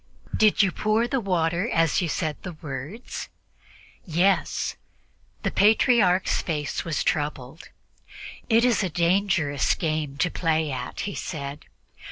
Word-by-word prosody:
"Did 215 -1 +4
you 190 - +2
pour 215 +5 +1
the 270 +1 0
water 180 -1 0
as 165 +1 +2
you 175 - -1
said 155 -1 -1
the 180 - -6
words?" 155 - -7 0.7
"Yes." 180 +2 +1 0.7
The - - 0
Patriarch's 205 -3 +3
face 150 -4 -3
was 165 -3 -1
troubled. 145 -1 -3 0.8
"It 230 +1 +5
is 245 -3 +3
a 190 - -1
dangerous 170 -4 +1
game 155 -4 -2
to 180 +3 +1
play 160 -3 0
at," 125 -1 -5
he 200 - -3
said. 145 -2 -6
170 Hz, 130 wpm, -25 LUFS, 150-200 Hz, 0.8 s, It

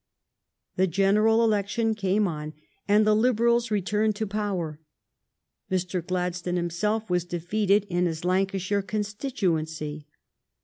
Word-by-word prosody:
The 190 +1 +3
general 210 +5 +3
election 220 +1 +1
came 200 0 +1
on, 155 -2 -5 0.3
and 210 +1 +4
the 215 0 +4
Liberals 235 0 +2
returned 210 +1 0
to 220 - -2
power. 195 -7 -3 0.9
Mr. 180 -1 -1
Gladstone 180 0 -2
himself 195 +6 -1
was 180 -1 +1
defeated 195 +4 +1
in 175 -1 +1
his 165 0 -4
Lancashire 195 +2 0
constituency. 180 - -3
195 Hz, 115 wpm, -26 LUFS, 175-215 Hz, 0.9 s, and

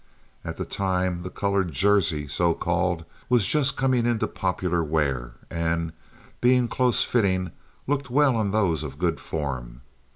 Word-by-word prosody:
At - - -6
that - - -5
time 95 -2 0
the 90 - -5
colored 100 -3 0
"jersey," 90 -5 +2
so 85 +4 +1
called, 85 -1 0 0.2
was 120 -5 +4
just 140 +5 +2
coming 130 -3 +2
into 120 -2 +1
popular 90 -2 -1
wear, 70 -6 -1 0.2
and, 85 -1 -1 0.5
being 125 0 +4
close 125 0 +2
fitting, 95 -6 +1 0.3
looked 140 -1 -1
well 135 0 +4
on 110 -3 +1
those 95 -7 +1
of 70 -3 -6
good 85 -1 0
form. 65 -5 -5
90 Hz, 150 wpm, -25 LUFS, 80-115 Hz, 0.5 s, was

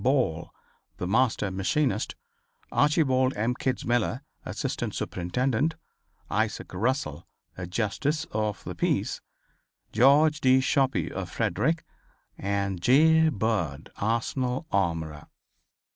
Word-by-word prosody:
Ball, 125 - +1 0.5
the - - -3
master 105 0 +1
machinist; 105 +4 0 0.6
Archibald 135 -3 +3
M. 115 +4 +1
Kitzmiller, 120 -3 -1 0.2
assistant - - -3
superintendent; 125 - -1 0.5
Isaac - - -2
Russell, 95 - -1 0.3
a 90 -1 -6
Justice 130 - -1
of 105 - -2
the - - -5
Peace; - - -1 0.7
George 145 +6 +5
D. 130 0 +5
Shope, 135 0 +2 0.2
of - - -4
Frederick 165 +3 0 0.5
and 100 -2 -2
J. 160 - +5
Bird, 95 - -2
Arsenal 125 +5 -1
armorer. 80 -5 -1
120 Hz, 100 wpm, -27 LUFS, 95-135 Hz, 0.7 s, George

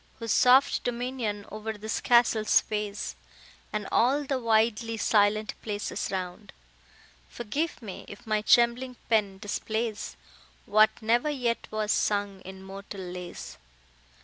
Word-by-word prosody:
Whose 230 -3 -3
soft 260 +5 +5
dominion 240 -4 -3
o'er 215 +1 -4
this 220 +1 -4
castle 235 -2 +4
sways, 210 -1 0 0.6
And 210 -1 -3
all 270 +5 +3
the 270 -1 -1
widely 225 0 +1
silent 215 0 +2
places 210 -1 -3
round, 185 +2 -5 0.8
Forgive 270 +6 -3
me, 195 -4 -8
if 205 - -11
my 215 -1 +1
trembling 240 +3 +3 0.2
pen 205 -3 +2
displays 215 +1 -3 0.5
What 215 +1 +5
never 240 +6 +2
yet 245 -5 -1
was 215 -1 -1
sung 200 -2 0
in 190 0 -10
mortal 195 +1 -8
lays. 180 -1 -8
215 Hz, 120 wpm, -28 LUFS, 205-235 Hz, 0.8 s, soft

